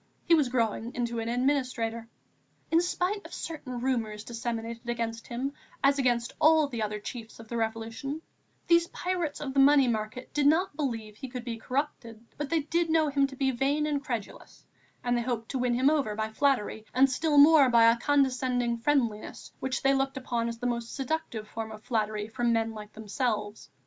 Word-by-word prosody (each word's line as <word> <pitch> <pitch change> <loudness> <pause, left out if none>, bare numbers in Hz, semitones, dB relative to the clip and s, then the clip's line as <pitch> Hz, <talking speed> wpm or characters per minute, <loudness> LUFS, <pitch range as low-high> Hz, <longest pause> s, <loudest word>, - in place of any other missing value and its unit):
He 340 - +4
was 300 -6 +4
growing 230 -1 -1
into 235 -1 -2
an 225 0 -3
administrator. 245 -3 0 0.6
In 330 +1 +5
spite 365 +3 -1
of - - -9
certain 255 -7 -6
rumours 225 -5 -1
disseminated 230 0 -5
against 230 -1 -3
him 260 +4 -3 0.3
as 280 +1 +4
against 245 -2 +1
all 315 -1 +6
the 240 -5 -4
other 210 0 -2
chiefs 225 +1 -8
of 225 - -11
the 235 - -3
Revolution, 225 +6 -3 0.5
these 340 0 +4
pirates 350 -4 -3
of 275 -3 -4
the 275 - +2
money 275 -1 +6
market 220 +2 -3
did 290 -1 +3
not 320 +2 +3
believe 230 -8 -3
he 265 - -7
could 250 -1 -6
be 235 -2 -4
corrupted, 250 -2 -3 0.2
but 295 -1 -4
they 330 -1 +2
did 330 +3 0
know 315 -1 +3
him 280 -1 +2
to 270 - -10
be 265 0 +1
vain 275 +4 +1
and 290 -2 -1
credulous, 235 -7 -6 0.4
and 245 0 +1
they 240 - +1
hoped 235 -2 -3
to 265 - -2
win 245 -1 +1
him 265 +4 +4
over 275 -9 0
by 220 0 -2
flattery 220 -5 +1
and 265 +2 +6
still 295 +3 0
more 290 -2 +8
by 235 -1 +6
a 235 - 0
condescending 255 -4 +1
friendliness 235 -5 -1
which 260 0 -2
they 270 0 +4
looked 270 0 0
upon 240 -3 -2
as 230 0 -4
the 245 - -6
most 235 -1 -2
seductive 265 -6 -3
form 220 0 -5
of 215 0 -10
flattery 215 -2 -1
from 235 +1 0
men 225 -1 +1
like 215 -1 -9
themselves. 215 -1 -3
245 Hz, 195 wpm, -28 LUFS, 225-280 Hz, 0.6 s, more